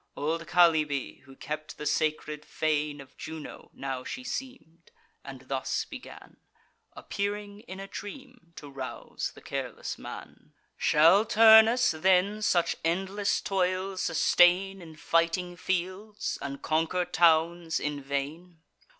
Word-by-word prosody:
Old 165 +3 -2
Chalybe, 160 -6 +2
who 135 0 -15
kept 155 +2 -6
the 150 - -6
sacred 150 0 -1
fane 150 -2 -1
Of 140 0 -13
Juno, 160 -1 -8
now 135 -2 -5
she 255 - -6
seem'd, 250 -11 -7 0.3
and 135 -2 -9
thus 135 -1 -2
began, - - -12 0.6
Appearing 205 0 -4
in 190 - -8
a 195 - -6
dream, 240 -1 -10
to 145 - -10
rouse 135 -2 -6
the - - -13
careless - - -5
man: - - -10 0.2
"Shall 165 +7 +5
Turnus 225 +2 +6
then 190 +5 +2
such 175 -5 +1
endless 195 +5 0
toil 190 0 -1
sustain 190 0 +3
In 160 -2 -12
fighting 170 +3 0
fields, 185 +4 -3
and 140 0 -6
conquer 165 +3 0
towns 170 -1 +2
in 150 -1 -3
vain? 150 +5 -5
170 Hz, 125 wpm, -28 LUFS, 150-195 Hz, 0.6 s, Turnus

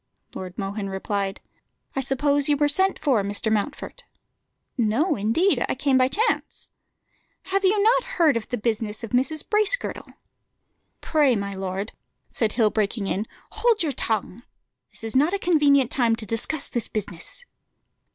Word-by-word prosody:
Lord 185 -1 -7
Mohun 200 0 -3
replied 195 0 -3 0.5
"I - - 0
suppose 280 +2 +1
you 290 - +3
were 295 0 +3
sent 380 +7 +2
for, 260 -8 +2
Mr. 205 +2 -2
Mountfort?" 290 - -3 0.7
"No, 260 - +1
indeed, 250 - +2
I - - 0
came 275 -2 +1
by 255 0 +5
chance." 430 - -1 0.7
"Have 390 +1 -1
you 395 +2 +3
not 475 +3 +4
heard 320 -6 +4
of 230 - -3
the 245 - -2
business 220 0 -2
of 230 - -6
Mrs. 275 +5 0
Bracegirdle?" 430 +3 +1 0.9
"Pray, 290 -6 +3
my 200 -1 -3
lord," 190 +2 -4 0.4
said 220 -3 0
Hill, 220 -3 +3
breaking 215 0 -1
in, 200 +3 -2 0.2
"hold 440 -3 +2
your 310 - 0
tongue. 220 -3 -2 0.5
This - - -14
is 225 +1 -5
not 300 +8 +3
a - - 0
convenient 290 -8 +3
time 235 -4 +2
to 225 -1 -8
discuss 235 +8 -1
this 240 -3 -3
business." 210 - -5
250 Hz, 155 wpm, -24 LUFS, 210-310 Hz, 0.9 s, by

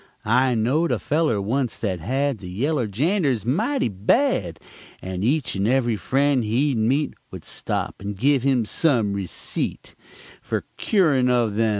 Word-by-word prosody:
I 125 +3 +3
knowed 135 +10 +1
a - - +1
feller 150 -6 0
onc't 120 +5 -1
that 95 -5 -1
had 135 - -1
The 90 - -8
yeller 125 - -1
janders 135 - 0
mighty 220 - +1
bad, 100 - +1 0.4
And 95 0 -5
each 140 +4 +1
and 100 +1 0
ev'ry 120 -2 +2
friend 135 +3 +1
he'd 120 +4 +1
meet 135 +7 +1 0.2
Would - - -10
stop - - -3
and 100 0 -5
give 135 +4 +3
him 130 -3 +2
some 115 -6 +1
receet 100 -3 -4 0.5
Fer - - -3
cuorin' 150 -11 +2
of 115 -4 +1
'em. 115 -1 +3
125 Hz, 155 wpm, -23 LUFS, 105-145 Hz, 0.5 s, I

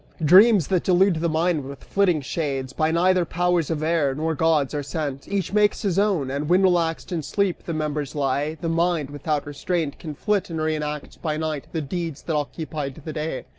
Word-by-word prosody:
Dreams 195 +2 +7
that 185 -3 +1
delude 185 -1 +3
the 170 +1 0
mind 160 -1 +1
with 140 0 -9
flitting 185 -6 +1
shades 135 -3 -3
By 155 0 +1
neither 180 +2 +3
powers 175 -1 0
of 155 -2 -2
air 155 -4 +1
nor 160 +2 -1
gods, 155 -3 +2
are 145 - -1
sent: 145 -2 -4
Each 200 -2 -2
makes 210 +1 +2
his 195 -2 +1
own! 185 -11 +1
And 145 +2 -3
when 185 +2 +4
relaxed 170 -3 +1
in 170 -3 -1
sleep 195 +4 -1
The 165 - -3
members 150 -3 -3
lie, 145 +2 0
the 170 - -2
mind, 165 -3 0
without 145 0 -2
restraint 145 +1 -2
Can 155 -4 -7
flit, 200 +3 0
and 165 -1 -4
re 155 0 0
enact 150 -1 -5
by 155 -2 -1
night, 155 -2 -3
the 160 - -2
deeds 165 +1 -4
That 160 - -2
occupied 150 -1 -4
the 155 - -5
day. 155 0 -4
160 Hz, 205 wpm, -23 LUFS, 145-175 Hz, -, Dreams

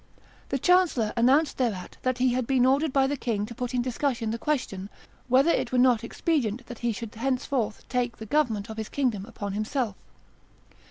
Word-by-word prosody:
The 275 - 0
chancellor 345 -9 +3
announced 270 +7 +3
thereat 215 -8 -2
that 255 -1 0
he 250 0 +2
had 250 -2 -1
been 260 -2 +3
ordered 280 +3 +3
by 270 0 +3
the 280 +2 0
king 225 -6 -2
to 235 - -8
put 250 +1 -4
in 245 - +1
discussion 250 -2 -1
the 230 - -3
question, 205 -10 -2 0.4
whether 265 +6 +5
it - - 0
were 255 - +1
not 245 -3 +4
expedient 240 -3 -1
that 245 - -9
he 240 -1 0
should 225 +1 -6
henceforth 250 -2 -2
take 245 -2 -1
the 220 - -8
government 225 -6 0
of 220 -1 -8
his 220 -1 -4
kingdom 240 -8 -1
upon 205 -4 -5
himself. 215 +1 -1
245 Hz, 195 wpm, -27 LUFS, 220-270 Hz, 0.4 s, whether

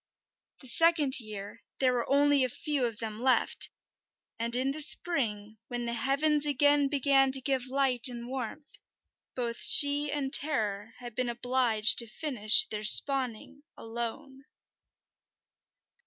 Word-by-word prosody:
The 260 - -6
second 300 -1 +3
year 210 -3 -11 0.2
there 255 -2 0
were 240 -1 -4
only 285 -1 +2
a 255 - -2
few 285 +1 -3
of 225 -2 -10
them 220 -1 -8
left, 260 0 0 0.7
and 235 +1 -3
in 260 +2 -2
the 300 - -7
spring, 220 -10 +2
when 240 -1 -6
the 235 - -5
heavens 285 +5 -1
again 290 0 +1
began 275 -1 0
to 265 - +2
give 260 -1 -4
light 265 -1 +2
and 240 -1 -8
warmth, 265 +3 -9 0.6
both 235 -2 -5
she 285 0 +4
and 275 -2 -5
Terror 220 -7 -1
had 240 -2 -11
been 250 +2 -4
obliged 240 -2 +1
to 235 - +1
finish 230 -3 +1
their 210 -1 -8
spawning 265 +3 +3 0.2
alone. 240 +4 -9
255 Hz, 140 wpm, -27 LUFS, 235-280 Hz, 0.7 s, she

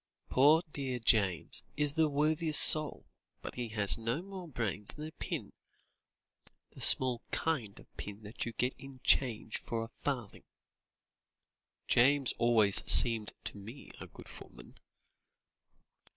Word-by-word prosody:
"Poor 150 +6 +4
dear 130 -3 -4
James 100 -7 0 0.2
is 145 -1 0
the 160 -1 +1
worthiest 155 +1 +2
soul, 155 -1 +5 0.4
but - - -7
he 125 -1 -5
has 105 -1 0
no 115 +9 -3
more 190 -2 -10
brains 110 - -4
than 150 - -8
a 155 - -9
pin - - -7 1.2
the - - -13
small 125 -2 +2
kind 130 -11 -3
of - - -16
pin 105 +1 -9
that 105 +3 -7
you 120 - -5
get 125 +3 -2
in 135 -1 -13
change 115 -4 0
for 115 -1 -5
a 115 - -9
farthing!" 125 -8 -5 1.4
"James 135 +2 +3
always 115 -4 +3
seemed 115 -3 +6
to - - -6
me 115 +8 -12
a - - -9
good - - -15
footman." - - -14
125 Hz, 135 wpm, -31 LUFS, 110-145 Hz, 1.4 s, seemed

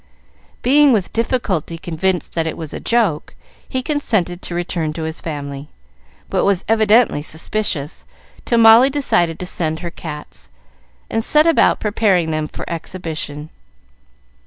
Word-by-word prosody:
Being 285 +2 +5
with 210 -7 0
difficulty 215 - -1
convinced 175 +3 -2
that 165 -1 -1
it 160 - -4
was 160 -3 -7
a - - -5
joke, 220 -10 0 0.3
he 260 -1 -2
consented 215 - 0
to 175 - -6
return 170 -3 -2
to 160 0 -5
his 160 +1 -5
family, 140 -2 -6 0.6
but - - 0
was 195 -2 +1
evidently 220 -5 +3
suspicious, 160 -1 -3 0.4
till 235 - +1
Molly 230 +3 +7
decided 175 - 0
to 180 - -6
send 160 -3 -3
her 170 -1 -5
cats, 150 -3 -9 0.6
and 225 - -2
set 300 +5 +5
about 330 - +3
preparing 200 -6 +1
them 155 -1 -2
for - - -8
exhibition. 160 -3 -6
175 Hz, 140 wpm, -18 LUFS, 160-225 Hz, 0.6 s, Molly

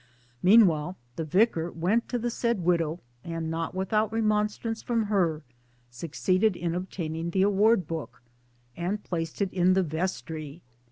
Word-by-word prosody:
Meanwhile 180 -4 +5 0.2
the 165 - -3
Vicar 170 0 +2
went 185 +8 0
to 245 - -1
the 240 0 -2
said 235 -4 0
widow 170 -1 +1 0.2
and 165 -1 -4
(not 165 +2 -3
without 215 +3 0
remonstrance 215 0 0
from 230 -2 0
her) 180 -7 0 0.5
succeeded 185 - 0
in 170 -1 -2
obtaining 170 -2 -4
the 190 +2 +2
Award 205 0 +3
Book; 160 -6 -6 0.5
and 190 +5 -3
placed 165 +2 -2
it 190 - -4
in 180 0 +4
the 190 0 +3
Vestry. 160 -2 -4
180 Hz, 145 wpm, -27 LUFS, 165-210 Hz, 0.5 s, Meanwhile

